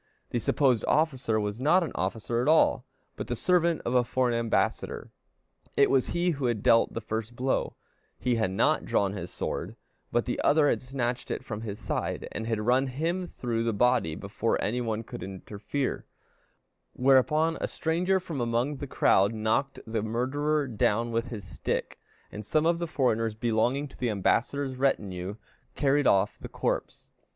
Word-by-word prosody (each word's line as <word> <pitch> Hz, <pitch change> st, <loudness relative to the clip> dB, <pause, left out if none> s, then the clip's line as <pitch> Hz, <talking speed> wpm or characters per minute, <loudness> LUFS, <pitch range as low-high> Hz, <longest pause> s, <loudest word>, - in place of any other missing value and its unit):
The 120 Hz, -, 0 dB
supposed 125 Hz, +1 st, +2 dB
officer 130 Hz, -8 st, +1 dB
was 105 Hz, +1 st, -3 dB
not 175 Hz, +7 st, +4 dB
an 165 Hz, -, -4 dB
officer 115 Hz, +5 st, -1 dB
at 125 Hz, -, -1 dB
all, 160 Hz, +1 st, +4 dB, 0.3 s
but -, -, -5 dB
the 120 Hz, -, -2 dB
servant 170 Hz, +5 st, +2 dB
of 120 Hz, -, -1 dB
a 125 Hz, -1 st, +4 dB
foreign 125 Hz, 0 st, 0 dB
ambassador; 115 Hz, -1 st, -1 dB, 0.7 s
it 140 Hz, -, +5 dB
was 135 Hz, -2 st, +3 dB
he 175 Hz, +1 st, +1 dB
who 140 Hz, -4 st, -3 dB
had 115 Hz, -4 st, -1 dB
dealt 115 Hz, -, +4 dB
the 115 Hz, -, -2 dB
first 110 Hz, +1 st, -4 dB
blow; 130 Hz, +2 st, -1 dB, 0.4 s
he 125 Hz, -1 st, 0 dB
had 110 Hz, -4 st, +1 dB
not 95 Hz, -, +2 dB
drawn 100 Hz, -1 st, +1 dB
his 90 Hz, -4 st, -6 dB
sword, -, -, -4 dB, 0.4 s
but -, -, +1 dB
the -, -, -2 dB
other 145 Hz, 0 st, +4 dB
had -, -, 0 dB
snatched 125 Hz, -2 st, -3 dB
it -, -, -4 dB
from 110 Hz, -1 st, -5 dB
his 105 Hz, -3 st, -5 dB
side, 110 Hz, -, -3 dB
and 110 Hz, -, -4 dB
had 110 Hz, -2 st, -1 dB
run 125 Hz, +4 st, +2 dB
him 165 Hz, +8 st, -2 dB
through 115 Hz, -6 st, -2 dB
the 115 Hz, -1 st, 0 dB
body 120 Hz, -7 st, +2 dB
before -, -, -1 dB
any 120 Hz, +5 st, -1 dB
one 115 Hz, -1 st, -2 dB
could 100 Hz, -, -8 dB
interfere; 100 Hz, +8 st, -4 dB, 0.9 s
whereupon 150 Hz, +5 st, +3 dB
a -, -, 0 dB
stranger 180 Hz, +4 st, 0 dB
from 165 Hz, -7 st, -5 dB
among 120 Hz, +5 st, 0 dB
the 140 Hz, -, -6 dB
crowd 100 Hz, -4 st, +3 dB
knocked 110 Hz, +6 st, 0 dB
the 110 Hz, -1 st, -2 dB
murderer 140 Hz, +7 st, 0 dB
down 115 Hz, 0 st, +1 dB
with 115 Hz, +1 st, -1 dB
his 110 Hz, -6 st, -7 dB
stick, 90 Hz, -, -3 dB, 0.3 s
and 105 Hz, -, -7 dB
some 155 Hz, +9 st, +1 dB
of 170 Hz, 0 st, +2 dB
the 170 Hz, -, -2 dB
foreigners 115 Hz, -7 st, 0 dB
belonging 120 Hz, +5 st, 0 dB
to 135 Hz, -, -16 dB
the 125 Hz, -, 0 dB
ambassador's 130 Hz, +6 st, 0 dB
retinue 100 Hz, -8 st, -1 dB, 0.4 s
carried 145 Hz, 0 st, +2 dB
off 100 Hz, +1 st, +2 dB
the -, -, -8 dB
corpse. -, -, -3 dB
120 Hz, 175 wpm, -28 LUFS, 110-140 Hz, 0.9 s, it